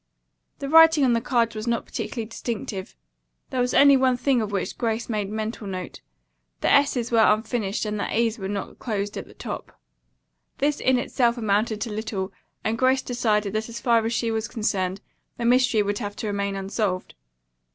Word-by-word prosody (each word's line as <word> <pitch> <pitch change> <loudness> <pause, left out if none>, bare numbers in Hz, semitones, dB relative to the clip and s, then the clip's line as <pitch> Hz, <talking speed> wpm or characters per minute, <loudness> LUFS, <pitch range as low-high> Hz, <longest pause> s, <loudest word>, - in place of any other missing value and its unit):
The 275 - -5
writing 320 -1 +7
on 245 - +3
the 230 - +1
card 235 -2 +1
was 215 +1 -5
not 235 -1 0
particularly 230 -4 -4
distinctive. 215 -4 -5 0.6
There 255 - 0
was 245 0 0
only 280 0 +7
one 260 -1 +3
thing 255 -1 +2
of 210 -1 -3
which 195 -2 -2
Grace 230 -1 -2
made 210 -4 -2
mental 215 0 -4
note. 185 -2 -6 0.6
The - - +2
s's 260 -4 +3
were 230 - +4
unfinished 215 -1 +1
and 210 0 -2
the - - -2
a's 230 0 +1
were 190 - -4
not 200 0 -5
closed 205 -3 -3
at - - -6
the - - -16
top. - - -7 0.8
This 290 +1 +1
in 260 0 +3
itself 245 -1 +1
amounted 215 0 0
to 230 - -3
little, 210 -3 -4 0.3
and 225 +1 -1
Grace 260 +1 +3
decided 215 -4 0
that 220 +1 -2
as 230 0 -6
far 235 -2 +3
as 225 - -1
she 230 -1 0
was 220 0 -1
concerned 195 -3 -1 0.4
the 235 - -3
mystery 245 -3 +4
would 205 0 -2
have 205 -3 -5
to - - -5
remain 200 -1 -1
unsolved. 195 -1 -2
225 Hz, 190 wpm, -24 LUFS, 205-245 Hz, 0.8 s, writing